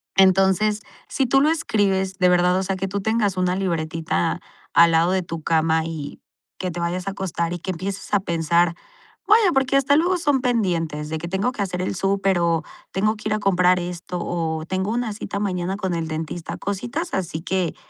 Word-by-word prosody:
Entonces, 195 +2 +4 0.3
si 270 - 0
tú 270 +2 +3
lo 305 - +4
escribes 195 -11 0
de 180 0 +5
verdad, 180 +1 +3
o 190 - 0
sea, 190 0 -2
que 195 +1 -2
tú 200 +1 -3
tengas 210 -3 0
una 180 0 +1
libretita 165 - -1 0.3
al 170 0 +6
lado 165 +2 +3
de 190 -1 +1
tu 165 -1 -6
cama 160 0 +2
y 155 -3 -6 0.4
que 185 -1 -3
te 175 - -5
vayas 180 +2 -2
a - - 0
acostar 170 -3 -3
y 175 - -4
que 185 - -4
empieces 195 +4 -5
a 205 - +4
pensar, 170 0 +1 0.5
vaya, 425 -3 +5
porque 270 0 +2
hasta 275 +1 +4
luego 355 +3 +2
son 290 -5 +2
pendientes, 175 - -1
de 160 - -2
que 170 - -6
tengo 190 +7 0
que 215 - -5
hacer 180 -2 -2
el 185 - -2
súper, 195 -1 +1
o 170 -1 +1 0.3
tengo 215 +3 +1
que 215 - -6
ir - - +1
a 215 - 0
comprar 180 -2 +3
esto, 175 0 -5
o 160 -2 -2
tengo 190 +4 -2
una 235 -2 -1
cita 200 -1 -5
mañana 185 -2 -1
con 190 -3 -2
el 165 -1 -2
dentista, 160 +1 -5
cositas, 240 - -4
así 165 -4 -2
que 185 -2 -1
185 Hz, 205 wpm, -22 LUFS, 170-205 Hz, 0.5 s, al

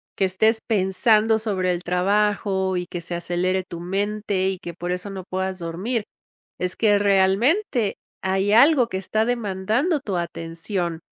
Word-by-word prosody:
que 195 - +1
estés 220 +4 +2
pensando 215 +2 +3
sobre 190 -4 0
el 175 0 -3
trabajo, 190 0 +1
y 180 - -2
que 175 - -5
se 175 +1 -5
acelere 180 +2 -1
tu 170 - -7
mente, 200 +1 -1
y 190 -1 -4
que 170 - -7
por 175 +1 -4
eso 180 +3 -3
no 190 -1 -6
puedas 190 0 -2
dormir. 190 +8 -2 0.6
Es 180 0 0
que 205 -2 +3
realmente, 205 - +2 0.3
hay 190 +2 +1
algo 260 +1 +6
que 190 - -4
está 215 +3 0
demandando 235 - 0
tu 205 -8 -4
atención 170 +1 -3
190 Hz, 155 wpm, -23 LUFS, 180-215 Hz, 0.6 s, algo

